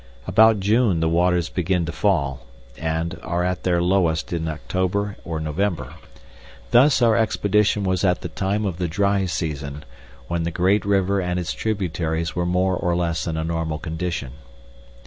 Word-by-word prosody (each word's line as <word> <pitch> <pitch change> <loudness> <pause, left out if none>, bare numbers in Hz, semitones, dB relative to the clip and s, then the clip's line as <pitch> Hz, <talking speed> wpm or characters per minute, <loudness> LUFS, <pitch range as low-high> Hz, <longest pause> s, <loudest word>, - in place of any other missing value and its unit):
About 110 +2 +5
June 105 -2 +2
the 80 - +1
waters 85 0 +2
begin 90 0 0
to 85 - -3
fall, 70 -8 0 0.3
and 80 +2 -3
are 85 +2 -1
at 90 0 -1
their 90 -2 +1
lowest 90 -3 +1
at 80 -1 -2
October 95 +5 -2
or 80 -1 -4
November. 80 +3 -2 0.8
Thus 130 +1 +5
our 115 -2 +5
expedition 105 -2 +2
was 95 -1 0
at 90 -2 +2
the - - -5
time 100 +2 -1
of 90 -3 -3
the 90 - 0
dry 100 +2 +1
season, 75 -4 -4 0.4
when 85 -1 -1
the 85 - -1
great 95 +4 +1
river 100 -1 +2
and 90 0 -1
its 90 - -3
tributaries 85 -6 -2
were 90 -1 0
more 90 +1 +1
or 90 -1 0
less 85 -2 -1
in 80 -1 -2
a 80 - -1
normal 80 -1 -2
condition. 80 -4 -4
90 Hz, 165 wpm, -22 LUFS, 80-100 Hz, 0.8 s, About